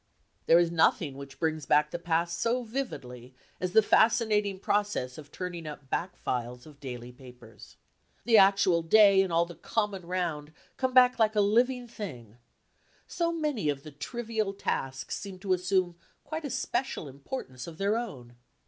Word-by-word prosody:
There 165 - +7
is 170 -1 +3
nothing 160 -3 +2
which 140 0 -10
brings 155 0 -2
back 150 0 +3
the 175 - -4
past 170 0 -1
so 245 +2 0
vividly 130 - -6 0.2
as 180 0 -3
the 220 - +6
fascinating 215 -3 +3
process 200 -12 -1
of 145 -1 -13
turning 175 -3 -6
up 145 -3 -9
back 180 +2 -2
files 125 0 -4
of 150 -2 -15
daily 125 -3 -7
papers. 125 -3 -15 0.5
The 230 -1 +4
actual 195 -3 +4
day 200 +3 +6
and 190 -2 -1
all 170 +1 +3
the 175 - -10
"common 200 -3 -3
round" 165 -4 -3 0.2
come 260 -1 -2
back 250 -1 +6
like 220 -1 +3
a - - +3
living 245 +4 +2
thing; 125 - -8 0.7
so 335 -1 -1
many 300 - -1
of 140 -1 -2
the 155 - -10
"trivial 220 - -3
tasks" 135 -8 -3
seem 195 -2 -8
to 190 0 0
assume 180 -1 0 0.3
quite 315 0 -5
a - - -3
special 260 - -2
importance 135 - -7
of 165 -2 -9
their 200 +3 +1
own. 130 - -6
180 Hz, 165 wpm, -29 LUFS, 145-220 Hz, 0.7 s, There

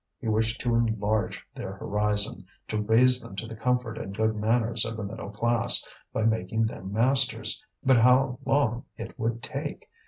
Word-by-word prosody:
He - - -7
wished 110 +1 +1
to 120 -2 0
enlarge 110 -2 0
their 95 - -6
horizon, 105 +1 -1 0.2
to 110 0 -1
raise 125 +4 +4
them 95 - -11
to 105 - -3
the 115 0 -8
comfort 125 0 -1
and 95 0 -7
good 110 0 +1
manners 115 +1 +1
of 115 0 -4
the 110 - -4
middle 100 0 -6
class, 115 +3 +2 0.3
by 110 - -1
making 110 0 +1
them 95 -3 -6
masters; 125 +6 +3 0.2
but 130 -1 +5
how 125 +2 +4
long 125 -4 +1
it - - -8
would 115 +1 -2
take! 145 +1 -5
115 Hz, 175 wpm, -27 LUFS, 110-125 Hz, 0.3 s, but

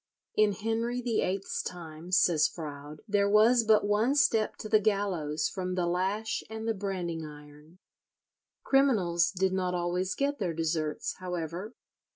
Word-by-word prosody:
"In 215 -1 +4
Henry 225 +4 -2
VIII's 200 -5 -1
time," 165 0 -8
says 175 -5 +4
Froude, 150 -2 -8
"there 200 -1 +2
was 225 +3 +5
but 215 -2 +4
one 215 +6 +2
step 225 -6 +2
to - - -7
the 215 0 +4
gallows 195 -8 0
from 185 -1 -4
the 180 -1 0
lash 195 +5 -1
and 220 0 -5
the 225 - +2
branding 185 -5 -4
iron." 150 +2 -13 0.9
Criminals 195 -11 +3
did 190 0 0
not 180 -1 -1
always 180 +2 -1
get 285 0 -1
their 175 -6 -2
deserts, 160 -2 -2
however. 180 +4 -5
190 Hz, 145 wpm, -29 LUFS, 170-215 Hz, 0.9 s, was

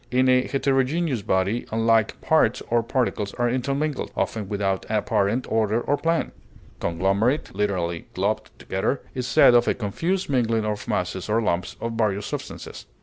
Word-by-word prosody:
In 130 +1 +3
a 125 0 +4
heterogeneous 135 0 +1
body 95 +5 0
unlike 115 -1 +2
parts - - +2
or 120 0 +4
particles 115 -4 -1
are 120 -1 +1
intermingled, 140 +4 -1
often 105 -3 -2
without 100 -2 -1
apparent 110 +2 +1
order 110 0 +1
or 145 - 0
plan. 165 +2 0 0.5
Conglomerate 100 - 0
(literally, 90 -5 -1
globed 100 +4 -1
together) 95 +8 -2
is 125 -1 -3
said - - +6
of 120 0 +4
a - - +2
confused 165 - -2
mingling 115 -5 +1
of 105 -1 -3
masses 90 +2 -2
or 110 +2 +3
lumps 90 -5 -1
of 115 - -3
various 105 -3 0
substances. - - -7
115 Hz, 150 wpm, -24 LUFS, 100-130 Hz, 0.5 s, said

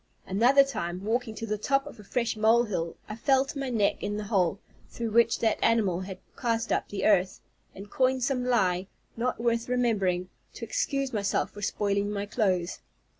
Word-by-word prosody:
Another 245 +8 +5
time, 180 -9 -4
walking 225 0 -1
to 225 - -5
the 215 -1 -2
top 275 +5 +1
of 290 -6 -11
a - - -11
fresh 235 +3 -1
molehill, 215 -6 +2
I 215 - -6
fell 265 +4 +3
to 280 +1 -6
my 270 -1 -2
neck 215 -5 +1
in 205 0 -2
the 210 - -3
hole, 195 -4 +1 0.3
through 230 -2 -4
which 235 +1 +4
that 220 -1 +2
animal 210 -6 +2
had 190 0 -6 0.2
cast 230 -1 -1
up - - 0
the 205 - -3
earth, 190 -3 +3 0.4
and 195 +2 -9
coined 260 +3 +1
some 250 -1 0
lie, 190 -7 +1 0.3
not 245 +1 -1
worth 235 0 0
remembering, 200 -8 +1 0.3
to - - -6
excuse 275 - -1
myself 200 -2 0
for 205 - -10
spoiling 200 0 0
my 205 -1 -3
clothes. 190 -5 0
220 Hz, 185 wpm, -28 LUFS, 200-245 Hz, 0.4 s, Another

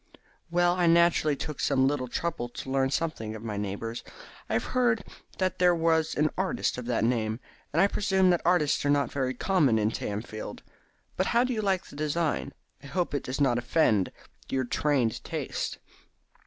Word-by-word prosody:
"Well, 175 +1 +3
I 175 -1 +2
naturally 165 -3 +4
took 150 +1 -6
some 135 -2 +3
little 135 -2 -1
trouble 160 -2 -3
to 130 +2 -7
learn 135 0 +2
something 135 -8 -2
of 110 - -9
my 110 -2 -4
neighbours. 105 +3 -4 0.5
I - - -2
had - - +2
heard 240 -4 +1 0.3
that 185 -1 -1
there 180 -1 +5
was 160 -1 +1
an 150 +1 +2
artist 190 - -1
of 120 - -7
that 120 -2 0
name, 115 -1 0 0.3
and 155 - 0
I 190 - +7
presume 190 -2 +2
that 175 - +1
artists 165 -4 +2
are 145 - +1
not 145 0 +2
very 130 -2 -2
numerous 155 -12 +3
in 105 0 +1
Tamfield. 110 0 -5 0.5
But 185 - +1
how 235 +1 +3
do 255 0 -1
you 220 - -1
like 195 -3 +1
the - - -13
design? 155 +2 -1 0.3
I - - -11
hope 180 +1 -1
it 145 - 0
does 130 +2 -4
not 125 -4 +3
offend 115 - +2 0.4
your 130 -1 0
trained 130 -2 0
taste." - - -3
145 Hz, 185 wpm, -28 LUFS, 120-175 Hz, 0.5 s, I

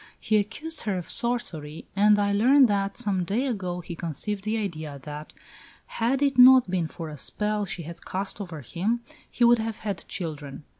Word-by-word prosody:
He 215 - +2
accused 295 +11 -3
her 200 -3 -1
of 175 - -5
sorcery, 165 -11 0
and 210 +1 +5
I 200 0 +1
learn 260 +7 +6
that, 200 -3 0
some 190 -3 0
days 240 +9 0
ago, 180 -5 -4
he 170 - -7
conceived 175 +5 -4
the 220 +1 0
idea 155 -9 -4
that, 150 0 -8 0.5
had 255 +5 0
it 275 -3 +1
not 255 -1 +9
been 175 -3 0
for 160 0 -7
a 150 - -8
spell 210 +4 -1
she 180 -2 -5
had 170 +2 -10
cast 195 +2 -4
over 170 -6 -7
him, 200 - -2 0.3
he 245 - -1
would 240 0 +6
have 220 -1 -4
had 200 -5 -3
children.... 150 -5 -6
200 Hz, 190 wpm, -26 LUFS, 170-225 Hz, 0.5 s, not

